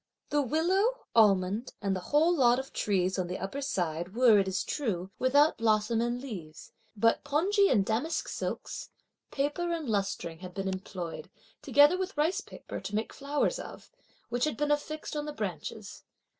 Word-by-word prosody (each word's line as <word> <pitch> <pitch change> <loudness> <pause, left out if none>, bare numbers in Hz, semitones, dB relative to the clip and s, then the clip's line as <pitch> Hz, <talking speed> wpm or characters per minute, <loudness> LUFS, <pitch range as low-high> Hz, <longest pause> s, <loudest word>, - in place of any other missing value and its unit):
The 295 - +3
willow, 370 - +1
almond 205 +1 +3
and 195 -1 -1
the - - -2
whole 320 +4 +4
lot 245 -5 +4
of 265 +1 -6
trees, 190 -2 0
on 180 - -1
the 180 - -4
upper 195 +10 -4
side, 175 - -2
were, 235 -4 +6
it 195 - +1
is 190 0 -1
true, 195 - -3
without 285 +3 +4
blossom 220 0 +2
and 240 +1 -1
leaves; 180 - -8 0.3
but 230 +3 +3
pongee 380 +8 +3
and 205 -6 +3
damask 255 +11 -1
silks, - - -5 0.4
paper 295 +5 -1
and 325 -4 -3
lustring 195 -6 -2
had 180 -1 -9
been 195 -1 -2
employed, 185 -3 -5 0.3
together 295 +6 +5
with 375 -4 -4
rice 315 +5 +1
paper, - - -8
to 205 - -5
make 220 +1 -2
flowers 290 - -1
of, - - -10 0.4
which 245 +2 +1
had 305 - -2
been 295 0 0
affixed 305 +1 -2
on 295 0 -2
the 300 - -5
branches. 205 - -5
240 Hz, 170 wpm, -30 LUFS, 195-295 Hz, 0.4 s, were